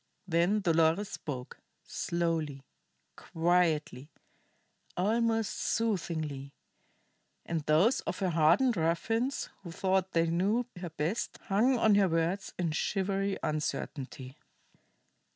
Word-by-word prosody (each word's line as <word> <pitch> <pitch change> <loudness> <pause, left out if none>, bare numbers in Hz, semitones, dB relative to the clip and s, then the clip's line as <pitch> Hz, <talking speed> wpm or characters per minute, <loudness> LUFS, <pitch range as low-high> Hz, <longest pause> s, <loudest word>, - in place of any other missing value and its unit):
Then 175 +5 +2
Dolores 165 +2 +2
spoke, 130 -4 -6 0.2
slowly, 165 -5 -2 0.5
quietly, 160 -5 0 0.9
almost 225 +2 +1
soothingly; 160 -10 -2 0.9
and 165 -2 -2
those 170 +12 +4
of - - -4
her 190 -4 0
hardened 170 +10 +4
ruffians 225 +11 0
who 175 -4 -8
thought 190 +1 0
they 165 0 +3
knew 195 +9 +1
her 175 -1 -5
best 160 +7 -2
hung 235 +7 +3
on 220 -2 +4
her 200 -2 +4
words 165 +4 0
in 170 -3 0
shivery 195 +4 -1
uncertainty. 145 -3 -4
175 Hz, 100 wpm, -30 LUFS, 160-200 Hz, 0.9 s, those